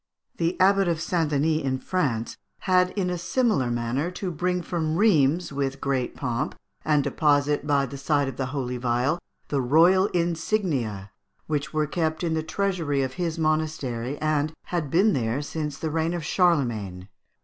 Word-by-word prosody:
The 170 +1 -1
abbot 195 0 +4
of 170 -2 0
St. 165 -1 0
Denis 155 +2 +1
in 130 -1 0
France 130 -9 -1 0.3
had 180 -1 +3
in 180 -2 0
a 180 - -2
similar 185 - +1
manner 120 +7 -1
to 180 0 -4
bring 180 +2 -1
from 160 -3 -1
Rheims 170 -5 +3
with 135 -1 -2
great 135 -3 -1
pomp, 130 +2 -2 0.3
and 150 -2 +2
deposit 145 0 +1
by 140 -2 +3
the 135 +1 -8
side 145 0 +1
of 135 - -5
the 130 0 -2
holy 130 -2 -3
vial, 125 +6 0 0.3
the 140 -2 +1
royal 170 +9 +5
insignia, 165 - -1 0.3
which 150 -2 -2
were 155 -1 +1
kept 160 +2 -1
in 165 -2 0
the 160 - 0
treasury 160 -4 -1
of 130 0 -3
his 165 -1 -1
monastery, 155 -5 -1
and 155 0 0
had 170 -5 -3
been 195 +8 +4
there 115 0 0
since 150 -1 -4
the 160 - -3
reign 165 +2 0
of 165 -3 -4
Charlemagne. 120 - +1
155 Hz, 170 wpm, -25 LUFS, 135-175 Hz, 0.3 s, royal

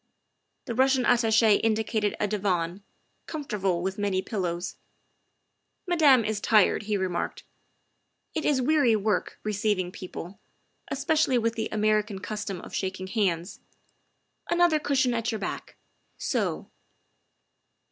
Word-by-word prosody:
The 235 - -3
Russian 260 +1 +3
Attache 220 -2 +4
indicated 220 -1 0
a 210 - +1
divan, 190 -3 -1 0.5
comfortable 200 - -2
with 190 +2 -3
many 195 -2 0
pillows. 180 -3 -3 0.5
" - - -50
Madame 295 -9 +5
is 215 -1 -1
tired," 210 -2 +4
he 210 - +2
remarked. 185 -2 -3 0.9
"It 315 - -2
is 270 -4 +2
weary 280 -5 +4
work, 210 0 -1
receiving 205 -3 0
people, 185 +1 -8 0.5
especially 300 -2 +1
with 230 -1 +1
the 220 -1 -3
American 215 -1 +1
custom 200 -1 -5
of - - -11
shaking 190 -1 -3
hands. 190 -3 -1 0.9
Another 345 -2 +3
cushion 270 -4 +1
at 230 0 -1
your 220 - -2
back 205 - -6 0.4
so. - - -2
215 Hz, 120 wpm, -27 LUFS, 190-245 Hz, 0.9 s, Madame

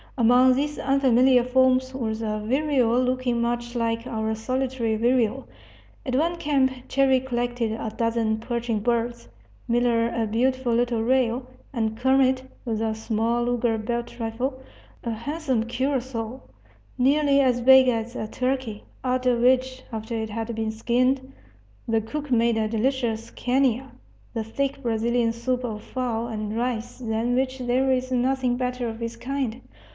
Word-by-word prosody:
Among 250 +2 +5
these 290 +2 -1
unfamiliar 260 -2 +4
forms 260 +1 +2
was 225 -4 -3
a 215 -1 -2
vireo 255 -1 +2
looking 255 -1 0
much 240 +1 -2
like 230 0 -1
our 220 -3 -2
solitary 255 0 -1
vireo. 240 +2 +1 0.6
At 255 -2 -1
one 335 +5 +1
camp 280 -5 +2 0.2
Cherrie 270 -1 +3
collected 245 -2 -2
a 220 0 -4
dozen 230 -1 0
perching 235 -1 -2
birds; 235 +2 -1 0.4
Miller 235 -1 +2
a 230 -1 -1
beautiful 250 +2 +1
little 235 -1 +1
rail; 250 0 +1 0.3
and 220 -3 -1
Kermit, 260 +1 +3 0.2
with 225 -3 -1
the 220 -1 0
small 225 +2 0
Luger 240 -2 +1
belt 235 +2 -4
rifle, 250 +4 -3 0.4
a 235 - -2
handsome 260 0 -2
curassow, 250 -1 -2 0.6
nearly 280 +2 +3
as 250 -3 +2
big 265 +1 +7
as 235 0 -1
a 215 - -3
turkey 255 -3 -2 0.2
out 255 0 0
of 245 -1 +3
which, 255 +1 +2
after 220 +1 -4
it 220 -1 -3
had 225 +2 -3
been 220 -1 -1
skinned, 255 +4 0 0.6
the 225 -1 +2
cook 290 +6 -6
made 235 -1 +3
a 220 -1 +1
delicious 230 0 -1
canja, 260 0 0 0.4
the 225 -2 -2
thick 275 +5 -2
Brazilian 235 0 +1
soup 250 +2 -2
of 215 -3 -4
fowl 235 -3 -2
and 215 -1 -4
rice 240 -2 -2
than 235 0 -1
which 260 0 -1
there 255 +2 +1
is 255 0 0
nothing 255 0 +1
better 250 -1 -2
of 225 0 -6
its 230 0 -4
kind. 255 -1 -3
245 Hz, 150 wpm, -25 LUFS, 230-260 Hz, 0.6 s, big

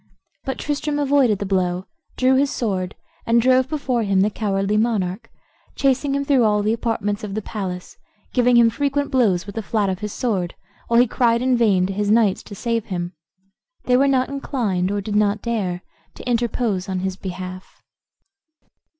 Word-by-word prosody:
But 265 -2 -3
Tristram 295 0 -2
avoided 275 -6 +3
the 200 - -4
blow, 185 -1 0 0.3
drew 255 +1 +4
his 275 +2 +3
sword, 190 -7 -2 0.3
and 230 +1 +4
drove 255 +2 +3
before 270 -6 -1
him 195 -3 +2
the 210 +2 +2
cowardly 200 -1 -1
monarch, 215 -1 0 0.5
chasing 275 +1 +1
him 280 0 -1
through 275 -4 +3
all 210 -1 +2
the 215 +2 +2
apartments 220 -3 -2
of 200 -2 -5
the 215 - -2
palace, 185 -5 -6 0.4
giving 245 -1 +4
him 230 -1 +6
frequent 285 +2 -1
blows 210 -9 +2
with 200 - -8
the 225 - -3
flat 210 -1 0
of 185 -1 -2
his 210 0 -4
sword, 195 -9 -2 0.3
while 235 0 +4
he 245 - +6
cried 235 0 +1
in 255 -1 +3
vain 205 -6 +3
to 195 - -3
his 205 +1 -1
knights 215 -3 +3
to 200 - -10
save 230 +1 -1
him. 175 -3 -4 0.7
They 250 - +2
were 275 +2 +4
not 260 -2 +2
inclined, 230 -10 -1
or 205 0 -1
did 205 +1 -4
not 210 0 +2
dare, 195 -7 -2 0.3
to - - -10
interpose 230 -5 0
in 185 -1 -2
his 190 0 -2
behalf. 185 -1 -8
220 Hz, 185 wpm, -21 LUFS, 195-250 Hz, 0.7 s, him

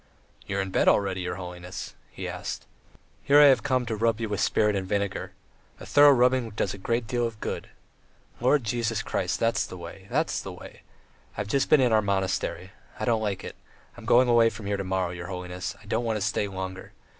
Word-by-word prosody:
"You 100 - -2
are - - +1
in 95 -1 -4
bed - - +2
already, 95 -2 +3
your 90 0 -3
holiness?" 90 0 -7 0.2
he - - -6
asked. - - -5 0.6
"Here 145 +1 +5
I 150 - +9
have 120 - -3
come 130 +2 0
to 115 -1 -2
rub 115 +1 +1
you 115 -2 -3
with 105 -2 -2
spirit 105 -1 +2
and 95 -1 -2
vinegar. 100 -1 -2 0.5
A - - -9
thorough 145 0 +7
rubbing 125 -2 +3
does 105 -2 -2
a 100 - -9
great 115 +4 -1
deal 120 0 0
of 110 -2 -10
good. - - -4 0.7
Lord 130 +3 +3
Jesus 115 0 -1
Christ!... - - -2
That's 115 0 +2
the 90 - -9
way... 90 +3 -10
that's 155 +6 0
the 95 - -7
way.... 90 - -12 0.6
I've 100 - -2
just 135 +6 0
been 150 - +6
in 125 -3 +3
our 110 - +5
monastery.... 95 -2 -2 0.3
I - - -1
don't 115 -2 +2
like 100 -3 -2
it. - - -7 0.4
I'm - - -12
going 125 +1 +5
away 115 -1 +5
from 110 -1 -9
here 100 0 -1
to 100 - -3
morrow, 95 -2 -1
your 85 -1 -7
holiness; 90 -1 -5
I 115 - -18
don't 110 +3 -1
want 115 -2 0
to - - -5
stay 105 0 0
longer. 95 -1 -6
105 Hz, 220 wpm, -26 LUFS, 95-120 Hz, 0.7 s, I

